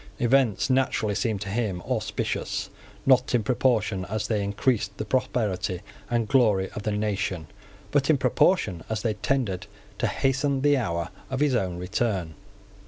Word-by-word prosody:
Events 120 -3 +3
naturally 130 -5 +1
seemed 100 0 -1
to 95 - -4
him 105 -4 -1
auspicious, - - -2 0.3
not 125 -2 +4
in 115 - +2
proportion 110 -5 +1
as 105 +2 -2
they 105 -3 0
increased 100 0 0
the 105 - -3
prosperity 105 -6 -1 0.3
and 120 -2 +1
glory 105 -7 +3
of - - -6
the 105 - -1
nation, 100 -5 -1 0.5
but 145 0 +2
in 155 - +5
proportion 110 - +2
as 110 -1 -2
they 110 -2 +1
tended 105 -4 -1 0.3
to - - +2
hasten 135 +1 +1
the 145 +1 +4
hour 85 -9 -1 0.2
of 130 - -2
his 145 -2 +3
own 95 -7 0
return. 90 -2 -1
110 Hz, 155 wpm, -26 LUFS, 95-130 Hz, 0.5 s, in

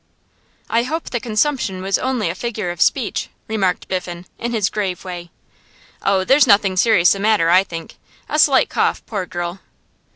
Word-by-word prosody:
'I 230 - +3
hope 315 +7 -4
the 240 - -1
consumption 215 -4 -1
was 195 +1 0
only 255 -6 -1
a 170 - -1
figure 215 -2 -4
of 175 - -7
speech,' 250 -7 +1 0.2
remarked 195 -5 -1
Biffen 180 -1 -4
in 235 - -3
his 215 -4 +1
grave 195 -3 -3
way. 175 -2 -7 0.7
'Oh, 195 -1 +2
there's 270 +6 +4
nothing 200 -3 +4
serious 185 -3 +4
the 195 - +1
matter, 205 -5 +3
I 185 +2 +6
think. 165 -3 -9 0.3
A 305 - -1
slight 280 -3 +5
cough, - - -1
poor 200 -5 -4
girl. 175 +2 -5
200 Hz, 170 wpm, -19 LUFS, 180-235 Hz, 0.7 s, I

